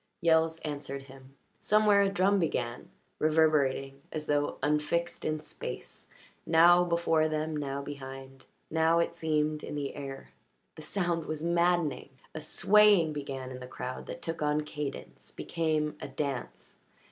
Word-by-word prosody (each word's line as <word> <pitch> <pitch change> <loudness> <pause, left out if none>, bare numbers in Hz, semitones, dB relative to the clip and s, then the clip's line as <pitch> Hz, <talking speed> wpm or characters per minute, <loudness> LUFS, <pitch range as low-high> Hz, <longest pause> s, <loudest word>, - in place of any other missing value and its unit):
Yells 160 -1 +3
answered 140 -2 -5
him. 135 0 -15 0.2
Somewhere 210 -1 +4
a 200 - +3
drum 195 +1 +2
began, 125 -8 -2 0.3
reverberating 145 -3 +2
as 155 -1 -4
though 145 0 0
unfixed 150 +4 0
in 155 -1 -1
space; - - -8 0.4
now 175 +2 +6
before 170 -2 +2
them, 155 0 -2
now 140 -1 -3
behind; 135 -1 -9 0.2
now, 160 +1 +3
it 170 - +1
seemed, 155 -1 0
in - - -5
the 140 -2 -3
air. 135 - -7 0.4
The - - -11
sound 170 0 -2
was 155 0 -4
maddening 170 -5 +1 0.2
A 155 - -5
swaying 200 0 +4
began 135 -3 -5
in 130 - -7
the 125 - -8
crowd 125 0 -6
that - - -7
took 165 -1 -4
on 150 0 +1
cadence, 150 -2 -7
became 155 -2 -1
a - - -5
dance. 140 -5 -5
155 Hz, 145 wpm, -30 LUFS, 140-165 Hz, 0.4 s, now